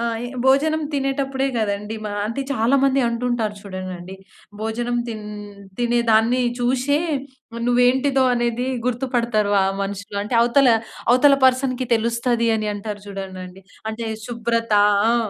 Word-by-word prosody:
ఆ! -, -, -2 dB, 0.2 s
ఏ -, -, -6 dB, 0.2 s
భోజనం 305 Hz, +4 st, +3 dB
తినేటప్పుడే 270 Hz, -1 st, -1 dB
గదండీ, 210 Hz, 0 st, -2 dB
మా 210 Hz, -, -3 dB, 0.2 s
అంటే, 230 Hz, +5 st, -3 dB
చాలా 250 Hz, +2 st, +2 dB
మంది 275 Hz, 0 st, +3 dB
అంటుంటారు 235 Hz, -2 st, -1 dB
చూడండండి. 185 Hz, -1 st, -7 dB, 0.5 s
భోజనం 240 Hz, +2 st, -2 dB
తిన్ 215 Hz, -2 st, -6 dB, 0.5 s
తినేదాన్ని 235 Hz, 0 st, +3 dB, 0.2 s
చూసే 260 Hz, +4 st, +1 dB, 0.7 s
నువ్వేంటిదో 260 Hz, +2 st, +3 dB
అనేది 240 Hz, +1 st, -1 dB, 0.2 s
గుర్తుపడతరు 240 Hz, -4 st, 0 dB
వా 195 Hz, -, +4 dB, 0.2 s
మనుషులు. 200 Hz, +1 st, -5 dB
అంటే, 230 Hz, +3 st, -1 dB
అవతల, 255 Hz, +2 st, +4 dB, 0.4 s
అవతల 275 Hz, +2 st, +6 dB
పర్సన్‌కి 255 Hz, 0 st, +1 dB
తెలుస్తది 235 Hz, +1 st, 0 dB
అని 215 Hz, -1 st, -2 dB
అంటారు 205 Hz, 0 st, -6 dB
చూడండండి. 190 Hz, -1 st, -8 dB, 0.3 s
అంటే, 225 Hz, +1 st, -5 dB, 0.2 s
శుభ్రతా 230 Hz, -3 st, +1 dB, 0.3 s
ఆ! -, -, +3 dB
235 Hz, 120 wpm, -21 LUFS, 215-255 Hz, 0.7 s, అవతల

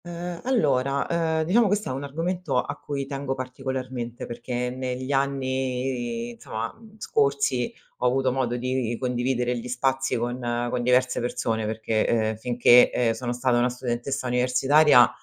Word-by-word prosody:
Uhm, 175 Hz, 0 st, -6 dB
allora, 140 Hz, -, +1 dB
uhm, 160 Hz, -1 st, 0 dB
diciamo 210 Hz, +8 st, +3 dB
questo 205 Hz, -3 st, 0 dB
è -, -, -2 dB
un 135 Hz, +2 st, -4 dB
argomento 165 Hz, -1 st, -1 dB
a -, -, -3 dB
cui 140 Hz, -2 st, -4 dB
tengo 135 Hz, -1 st, -3 dB
particolarmente, 130 Hz, -2 st, -5 dB
perché 120 Hz, +1 st, -3 dB
negli 130 Hz, +1 st, -4 dB
anni, 130 Hz, -3 st, -1 dB
insomma, 115 Hz, -1 st, -5 dB
mhmm, 220 Hz, -1 st, -17 dB
scorsi, 140 Hz, -, +1 dB, 0.3 s
ho 125 Hz, -, +1 dB
avuto 130 Hz, +1 st, +2 dB
modo 125 Hz, -2 st, -1 dB
di 125 Hz, -2 st, -1 dB
condividere 125 Hz, -1 st, 0 dB
gli 120 Hz, +1 st, -5 dB
spazi 130 Hz, +1 st, 0 dB
con 120 Hz, +2 st, -2 dB, 0.3 s
con 125 Hz, -, -1 dB
diverse 125 Hz, +1 st, +2 dB
persone, 110 Hz, -2 st, -1 dB
perché, 110 Hz, 0 st, 0 dB, 0.2 s
uhm, -, -, -5 dB
finché, 120 Hz, +1 st, +5 dB
ehm, 115 Hz, -2 st, +1 dB
sono 120 Hz, +1 st, -4 dB
stata 125 Hz, 0 st, +1 dB
una 125 Hz, +1 st, +3 dB
studentessa 125 Hz, +2 st, -3 dB
universitaria 125 Hz, +2 st, +5 dB
130 Hz, 150 wpm, -25 LUFS, 120-140 Hz, 0.3 s, finché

